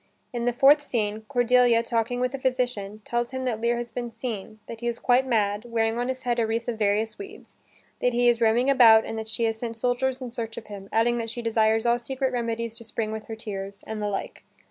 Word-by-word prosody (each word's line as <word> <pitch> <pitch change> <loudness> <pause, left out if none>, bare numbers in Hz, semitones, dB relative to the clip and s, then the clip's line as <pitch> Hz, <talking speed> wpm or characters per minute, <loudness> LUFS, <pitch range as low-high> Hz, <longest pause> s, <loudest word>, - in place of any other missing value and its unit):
In 235 -1 -2
the 245 - +3
fourth 275 +4 +6
scene, 220 -6 -2
Cordelia, 245 -2 +4
talking 235 +1 -1
with 250 +1 0
a 275 - -4
physician, 245 -6 -2
tells 240 0 -1
him 260 0 -4
that 225 -3 -2
Lear 235 +1 +1
has 240 -1 -5
been 240 0 -4
seen, 225 -2 -6
that 230 0 -8
he 240 - -3
is 235 -1 -1
quite 255 +1 +2
mad, 205 -3 +1
wearing 230 -1 0
on 245 - -1
his 260 0 -4
head 240 -1 0
a 225 - +2
wreath 230 +1 -2
of 230 -2 -3
various 215 - 0
weeds, 400 +1 -11 0.4
that 245 - +2
he 245 0 +2
is 240 -1 +3
roaming 230 +3 +3
about 230 -5 +7
and - - -5
that 220 0 -6
she 230 +1 -2
has 225 -1 0
sent 230 -1 -4
soldiers 250 +3 0
in 255 -2 -6
search 225 -2 -5
of 225 - -7
him, 200 -1 -9
adding 240 +2 +2
that 230 0 -3
she 240 +1 -6
desires 220 0 +2
all 240 0 +3
secret 265 +1 -2
remedies 230 -1 -2
to 230 - -7
spring 220 -1 -3
with 220 0 -6
her 225 - -5
tears, 200 -2 -7
and 220 -1 -5
the 210 - -1
like. 195 - -5
235 Hz, 245 wpm, -26 LUFS, 220-245 Hz, 0.4 s, about